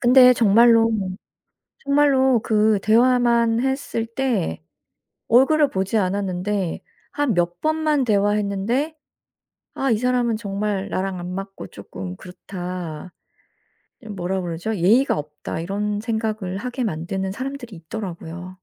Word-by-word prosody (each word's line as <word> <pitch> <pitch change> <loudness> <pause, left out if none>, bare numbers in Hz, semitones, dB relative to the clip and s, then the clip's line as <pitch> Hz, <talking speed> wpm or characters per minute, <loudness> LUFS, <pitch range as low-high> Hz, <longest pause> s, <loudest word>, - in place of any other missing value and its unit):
근데 250 0 +7
정말로, 230 0 +5 0.9
정말로 275 -3 +3
그 215 -1 +2
대화만 235 0 +3
했을 265 -4 -2
때 230 - -1 0.7
얼굴을 285 +5 +4
보지 190 +1 -1
않았는데 190 -1 -1 0.3
한 290 -6 +1
몇 175 0 -1
번만 310 -3 +1
대화했는데 210 +7 0 0.8
아 270 -1 0
이 220 - +2
사람은 245 -1 +1
정말 205 -1 -3
나랑 185 +1 -2
안 180 +1 -6
맞고 195 - -7
쪼끔 95 -2 -8
그렇다 180 - -7 0.9
이 - - -13
뭐라 190 -1 -3
그러죠 175 +5 -3
예의가 220 +10 +3
없다 150 +2 -6
이런 205 +4 -2
생각을 215 -4 -3
하게 250 +2 -3
만드는 190 +1 -3
사람들이 260 -2 -6
있더라고요. 175 0 -7
210 Hz, 260 characters per minute, -22 LUFS, 185-245 Hz, 0.9 s, 근데